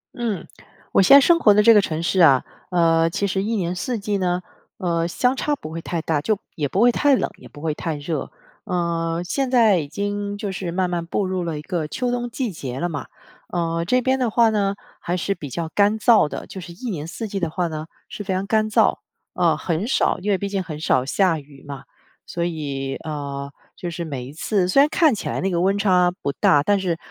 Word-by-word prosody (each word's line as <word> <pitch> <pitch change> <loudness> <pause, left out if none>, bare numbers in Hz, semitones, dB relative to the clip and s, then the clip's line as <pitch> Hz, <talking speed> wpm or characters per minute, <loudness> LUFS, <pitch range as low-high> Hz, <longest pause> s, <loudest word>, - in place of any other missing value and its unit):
嗯， 230 -6 -3 0.5
我 - - +4
现 195 +8 +8
在 280 - +9
生 335 +4 +4
活 210 -10 +6
的 210 +1 +4
这 230 - +8
个 210 - +7
城 160 -3 -3
市 185 +2 0
啊， 140 -7 +6 0.3
呃， 165 -2 +3
其 200 +4 -1
实 190 0 -1
一 225 +3 -1
年 180 -4 -1
四 230 +7 -3
季 205 -1 -2
呢， 180 -1 0 0.4
呃， 170 -2 0
相 250 +9 +1
差 295 +2 0
不 155 - -9
会 165 - -5
太 170 0 -3
大， 160 -2 0
就 210 +8 0 0.2
也 150 -3 -1
不 190 - 0
会 245 +1 +6
太 280 +3 +3
冷， - - -1
也 - - -13
不 145 - -13
会 160 -1 -1
太 160 +1 -3
热。 150 +2 -4 0.4
呃， 170 -3 -1
现 265 +9 -1
在 225 -6 +5
已 150 - -4
经 205 +4 -3
就 205 -1 -4
是 185 -1 -4
慢 180 +1 0
慢 175 -1 -2
步 190 +4 -1
入 185 -1 -2
了 165 -3 -3
一 - - -6
个 160 -1 -3
秋 250 +8 -2
冬 245 0 -2
季 240 -1 -3
节 135 -6 -6
了 175 - 0
嘛， 145 -4 -5 0.5
呃， 165 -1 -1
这 255 +4 +3
边 260 +1 +1
的 250 -2 +1
话 230 +1 +4
呢 200 -2 0 0.2
还 175 - -2
是 185 +3 -1
比 150 -7 -8
较 165 +5 -4
干 205 +4 +2
燥 220 -6 +5
的， - - -6
就 190 - -9
是 175 -1 -9
一 240 +8 -6
年 160 -6 -4
四 220 +6 -5
季 195 - -3
的 170 -3 -1
话 175 +2 -1
呢， 155 -1 -6 0.2
是 - - -7
非 190 -1 -2
常 190 +1 -1
干 215 +1 +1
燥， 215 - +3 0.4
呃， - - +2
很 170 +5 -2
少 270 - +2
因 195 +3 -3
为 200 - +3
毕 200 +1 -4
竟 195 -1 -1
很 160 -4 -7
少 130 -4 +2
下 170 +3 +2
雨 140 -1 -16
嘛。 140 -1 -8 0.4
所 170 0 -2
以， 140 -5 -3
呃， 140 -2 -5 0.2
就 175 - -5
是 170 0 -5
每 135 -5 -5
一 130 - -9
次 180 +5 0
虽 275 - +5
然 285 - +5
看 315 -3 +4
起 - - -5
来 - - -2
那 195 - 0
个 175 -2 0
温 195 +3 +2
差 180 -3 +3
不 140 - -1
大， 145 +1 +3
但 205 +5 +2
是， 180 -3 -1
180 Hz, 260 characters per minute, -22 LUFS, 160-205 Hz, 0.5 s, 在